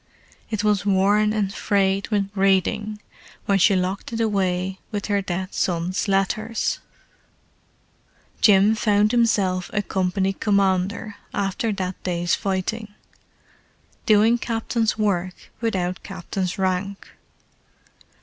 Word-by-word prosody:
It 215 -2 -2
was 210 -3 +2
worn 205 +2 +3
and 205 -2 -1
frayed 195 -1 +1
with 200 -2 -1
reading 205 +2 +1 0.5
when 195 -1 +2
she 195 +2 +5
locked 185 +3 -2
it 230 - -3
away 190 -3 0
with 205 -3 -4
her 200 -1 +1
dead 190 0 -4
son's 180 +1 -1
letters. 215 +3 0 1.6
Jim 205 0 +6
found 210 -1 +2
himself 200 -6 +1
a 205 -1 0
company 190 0 0
commander 200 +1 0 0.2
after 205 +4 -1
that 185 -2 -4
day's 175 -1 -1
fighting—doing 210 +2 -2
captain's 225 -1 -1
work 185 -4 0 0.2
without 185 -5 -2
captain's 190 0 -4
rank. 190 +1 -2
200 Hz, 105 wpm, -23 LUFS, 190-215 Hz, 1.6 s, Jim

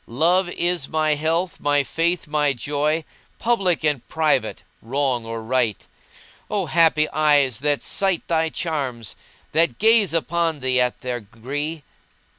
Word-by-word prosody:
Love 175 +9 +2
is 175 -5 -1
my 155 -1 +1
health, 165 +4 -1
my 145 -1 +2
faith, 170 +5 -1
my 150 -2 +1
joy 150 +5 -1 0.2
* - - -36
Public 195 -9 +1
and 145 -5 +1
private, 160 -1 0 0.2
wrong 125 -1 -1
or 115 0 -5
right. 120 -3 0 0.6
O 205 -3 -1
happy 155 0 +3
eyes 145 -6 +2
that 145 0 0
sight 195 -4 0
thy 160 -1 +1
charms 135 - -3 0.2
* - - -31
That 155 -6 +2
gaze 220 -2 +4
upon 165 -2 0
thee 130 -1 +2
at 125 0 -1
their 125 -1 -3
gree! 140 +8 -5
150 Hz, 145 wpm, -22 LUFS, 130-165 Hz, 0.6 s, gaze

